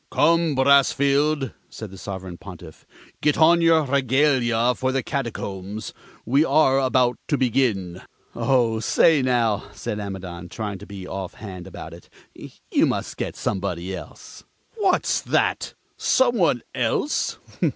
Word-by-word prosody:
"Come, 165 0 +2
Brassfield," 140 +1 +3 0.2
said 110 -4 -9
the 95 - -11
Sovereign 95 -3 -7
Pontiff, 85 -4 -12 0.3
"get 150 -1 +2
on 170 +2 +5
your 165 -1 +4
regalia 130 -3 +2
for 130 +2 -1
the 130 -1 -1
Catacombs. 105 -7 -5 0.3
We 135 +6 +3
are 135 -4 +3
about 130 -2 +2
to 145 - +1
begin." 110 -8 0 0.3
"Oh, 120 -4 +1
say, 150 +6 +4
now!" 120 -5 +1
said 105 - -5
Amidon, 90 -3 -7
trying 105 -1 -5
to 105 - -11
be 95 -2 -8
off 95 -1 -6
hand 95 -5 -9
about - - -9
it, - - -14 0.2
"you - - -2
must - - -3
get - - -4
somebody 95 -2 -3
else." - - -11 0.3
"What's 390 -4 +1
that! - - 0 0.2
Some 245 -2 +2
one 165 - +2
else? - - -1
120 Hz, 135 wpm, -23 LUFS, 100-140 Hz, 0.3 s, on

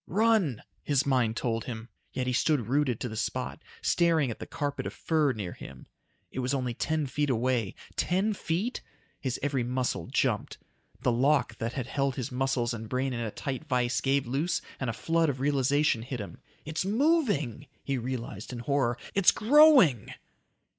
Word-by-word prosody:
"Run!" 205 - +2 0.2
his 140 -2 +1
mind 125 -5 +2
told 115 -2 -1
him. 115 -2 -6 0.2
Yet 130 - -2
he 125 - 0
stood 140 -2 +2
rooted 130 -1 +1
to - - -1
the 110 - -6
spot, 125 +6 -3 0.2
staring 165 -7 +3
at - - -7
the - - -7
carpet 145 -1 -3
of - - -6
fur 155 -4 +2
near 100 -7 -5
him. 65 -1 -11 0.5
It - - -5
was 130 +2 0
only 125 -3 -1
ten 155 +5 -1
feet 145 +2 -1
away. 120 -4 0 0.2
Ten 195 +4 +1
feet? 195 +6 -2 0.4
His 130 -3 -2
every 140 -3 0
muscle 125 -8 -1
jumped. - - 0 0.4
The 125 - +2
lock 130 0 +2
that 115 +2 -2
had 130 -3 -3
held 135 0 -1
his 135 +1 -4
muscles 125 -2 0
and 110 -1 -6
brain 130 +1 -1
in 120 - -3
a 115 -2 -2
tight 135 +7 -5
vice 125 -3 +1
gave 135 0 +1
loose 140 +8 0 0.2
and 130 - -2
a - - -1
flood 165 +7 +1
of 130 -2 -3
realization 140 -2 +2
hit 125 +1 -5
him. 100 - -8 0.2
"It's 155 +3 -2
moving!" 205 - +1 0.2
he 135 -2 -1
realized 120 -3 -5
in 125 - -5
horror. 120 -1 0 0.2
"It's 190 -4 +5
growing!" 235 - +6
135 Hz, 180 wpm, -29 LUFS, 120-150 Hz, 0.5 s, growing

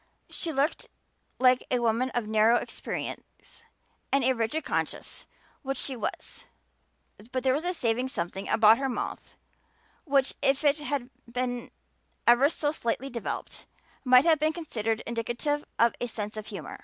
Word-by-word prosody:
She 335 - -3
looked 285 +2 0 0.5
like 255 0 +4
a 250 - +2
woman 235 +2 +1
of 240 -2 0
narrow 220 +2 +4
experience - - -5 0.5
and 275 -2 +3
rigid 230 +8 -1
conscience, - - -3 0.3
which 270 -2 -3
she 265 - -2
was; 235 - -5 0.9
but 255 -1 -2
there 260 -1 +3
was 300 +5 -1
a 360 - +2
saving 245 -2 0
something 190 -4 -4
about 220 +1 +6
her 270 -1 0
mouth 250 - -5 0.7
which, 275 -3 +2
if 270 +2 +2
it 290 0 +4
had 285 -4 -3 0.2
been 245 0 -2 0.6
ever 240 +4 +6
so 295 -2 -1
slightly 265 -1 -2
developed, 235 -2 -5 0.4
might 255 +1 +6
have 320 -3 +5
been 310 +1 +2
considered 225 -9 -2
indicative 240 +6 -2
of 235 0 +4
a 245 - 0
sense 210 -2 -5
of 215 -1 -6
humor. 195 -7 -7
250 Hz, 150 wpm, -28 LUFS, 230-280 Hz, 0.9 s, about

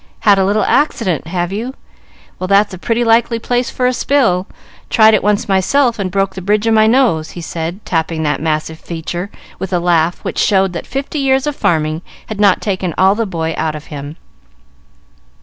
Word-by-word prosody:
"Had 200 -2 +4
a 190 - +3
little 205 +2 +1
accident, 195 - 0
have 175 +1 -2
you? 240 +6 -4 0.6
Well, 185 - -3
that's 200 +1 +3
a 185 - -8
pretty 230 +4 0
likely 230 0 +3
place 245 +2 -1
for 250 - -2
a 250 - +2
spill. 230 -9 +1 0.4
Tried 220 -1 +5
it 215 - +3
once 205 0 +1
myself 230 +6 +2
and 190 -2 -1
broke 195 0 0
the 190 - -7
bridge 205 +3 +1
of 225 - +3
my 215 0 +5
nose," 225 -10 +2
he - - -4
said, 170 +4 -5
tapping 160 -1 -1
that 150 -2 -1
massive 160 0 -2
feature 175 +3 -5 0.3
with 190 - -5
a 180 - +2
laugh 170 -1 +2
which - - -3
showed 190 -2 +2
that 170 - -6
fifty 275 +3 -4
years 270 0 +2
of 295 -1 -2
farming 155 - 0 0.3
had 215 -2 -5
not 200 -3 +4
taken 185 -4 -2
all 190 +1 +5
the 225 +1 -2
boy 165 -3 -3
out 155 -1 -1
of 150 - -8
him. 145 +1 -7
195 Hz, 200 wpm, -16 LUFS, 170-225 Hz, 0.6 s, Tried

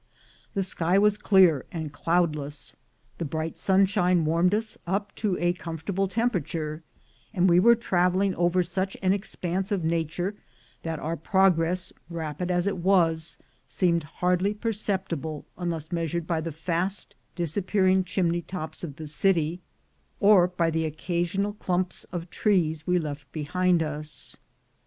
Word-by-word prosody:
The 195 - +1
sky 180 0 +1
was 210 +1 +4
clear 185 -8 +5
and 160 -3 -5
cloudless, 155 -3 -1 0.4
the - - -1
bright 160 +1 -3
sunshine 185 -3 +3
warmed 170 +5 +3
us 220 0 -3
up 200 +2 -1
to 200 -4 0
a 175 0 +2
comfortable 180 +3 -3
temperature; 165 - -1 0.5
and 180 0 +4
we 175 0 +6
were 235 +5 +7
traveling 190 -3 +1
over 175 +1 +2
such 190 +2 -3
an 185 0 +4
expanse 190 -1 -3
of 195 -4 0
nature 165 +3 -1 0.5
that 165 -1 -3
our 160 +2 -3
progress, 180 0 +2 0.2
rapid 165 +1 -4
as 175 0 +1
it 200 -1 0
was, 170 -3 +2 0.3
seemed 170 +4 +2
hardly 180 +6 0
perceptible, 190 - -3
unless 165 -3 -4
measured 170 -1 -1
by 165 -2 -1
the 165 +1 -4
fast 170 +5 -2 0.2
disappearing 185 +2 +2
chimney 175 -2 0
tops 170 -2 -6
of 150 -5 -5
the 155 0 -7
city, 165 +2 +1 0.6
or 200 -4 +6
by 175 -2 0
the 160 0 0
occasional 175 +5 -1
clumps 185 -3 -2
of 175 -1 -6
trees 160 -7 +1
we 180 0 +3
left 145 -3 -5
behind 170 +3 +1
us. 150 0 -6
175 Hz, 140 wpm, -26 LUFS, 160-190 Hz, 0.6 s, were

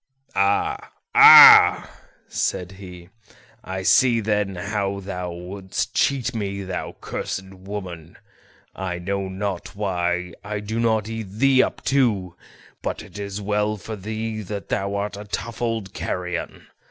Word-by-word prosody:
"Ah, 100 +1 0 0.2
ah!" - - +9 0.4
said 90 0 -2
he; 90 -2 -12 0.5
"I 95 0 -5
see 120 +4 +4
then 105 -3 -1
how 100 +1 -3
thou 90 -2 -5
wouldst 95 +2 -5
cheat 130 -3 0
me, 100 -3 -4
thou 95 -1 -5
cursed 95 0 -5
woman; 95 -4 -8 0.6
I 90 -2 -4
know 95 +2 -3
not 95 0 -5
why 90 -3 -2
I 105 +1 -4
do 110 +3 -4
not 110 -2 +1
eat 115 -3 -6
thee 130 +6 +3
up - - -3
too, 105 -10 +1 0.5
but - - -4
it 95 +3 -11
is 100 0 -5
well 105 +1 0
for 110 +3 -7
thee 110 +2 -5
that 100 0 -7
thou 100 +1 -2
art 100 0 -3
a 105 - -8
tough 115 +3 -6
old 115 -4 -2
carrion. 90 -1 -5
100 Hz, 140 wpm, -22 LUFS, 95-105 Hz, 0.6 s, ah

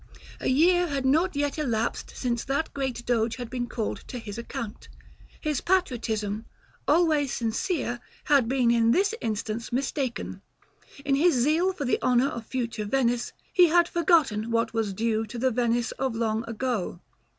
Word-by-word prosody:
A - - -3
year 350 +6 +4
had 275 -3 -2
not 320 +6 +3
yet 290 +1 -1
elapsed 235 -6 -1
since 240 -2 -1
that 280 +4 -1
great 265 -4 -3
Doge 230 -1 +1
had 245 -2 -7
been 245 -1 -2
called 220 -3 -2
to 250 - -6
his 220 -2 -7
account: 235 -2 -6 0.5
his 300 -4 -1
patriotism, 225 - 0 0.4
always 310 -6 +3
sincere, 240 - -1 0.2
had 280 -6 +4
been 250 -3 +3
in 230 -1 +3
this 390 - +3
instance 220 +1 -3
mistaken; 265 0 -2 0.6
in 275 - +2
his 315 +3 +4
zeal 310 +9 +3
for 330 -7 -4
the 255 - +1
honor 250 +2 +3
of 230 -2 -7
future 235 -4 -3
Venice, 240 +1 +1 0.2
he 360 -1 +7
had 340 +1 +4
forgotten 315 - +2
what 230 0 0
was 225 -3 0
due 220 +2 0
to 235 +4 -7
the 260 +2 +1
Venice 240 0 +1
of 260 -4 -2
long 225 0 -1
ago. 230 -7 -2
245 Hz, 160 wpm, -27 LUFS, 230-290 Hz, 0.6 s, he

